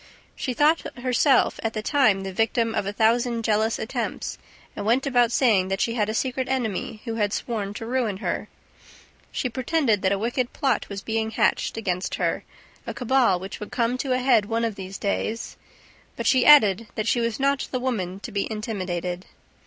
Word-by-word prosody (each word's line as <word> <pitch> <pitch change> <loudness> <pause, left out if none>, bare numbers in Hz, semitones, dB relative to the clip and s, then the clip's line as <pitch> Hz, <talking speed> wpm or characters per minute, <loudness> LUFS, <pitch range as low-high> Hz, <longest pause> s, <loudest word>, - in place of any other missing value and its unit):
She 255 - -3
thought 300 +3 +2
herself, 255 +2 +2
at 225 - -2
that 215 -1 -4
time, 220 -10 +3
the 190 0 -5
victim 225 +2 +1
of 195 - -1
a - - -1
thousand 230 +2 +1
jealous 220 +1 +1
attempts 220 - -4 0.4
and - - -4
went 235 +6 +2
about 245 -3 +3
saying 215 -8 +3
that 195 0 -2
she 230 - +1
had 215 -3 0
a 220 - -2
secret 260 +1 -1
enemy 225 -4 -2
who 230 -2 -3
had 205 -2 +1
sworn 210 -3 -3
to 225 - -6
ruin 235 -5 -1
her. - - -3 0.8
She 255 - -1
pretended 250 -2 0
that 190 - +2
a 200 - +2
wicked 240 +4 -2
plot 265 -7 0
was 200 -1 -6
being 220 0 -1
hatched 220 - 0
against 185 -4 -2
her, - - -1 0.4
a - - -4
cabal 250 -6 +2
which 190 +2 -7
would 210 - -8
come 235 0 0
to 265 -2 0
a - - +2
head 250 -5 +3
one 230 +1 0
of 225 - -2
those 195 -1 -7
days; 215 +3 -2 0.6
but - - -5
she 255 -2 +4
added 230 -8 +7
that 215 +1 -2
she 240 - +2
was 230 0 -1
not 275 0 +1
the 255 - -1
woman 195 -8 -2
to - - -7
be 200 +2 -2
intimidated. 185 -5 -4
225 Hz, 195 wpm, -24 LUFS, 205-250 Hz, 0.8 s, added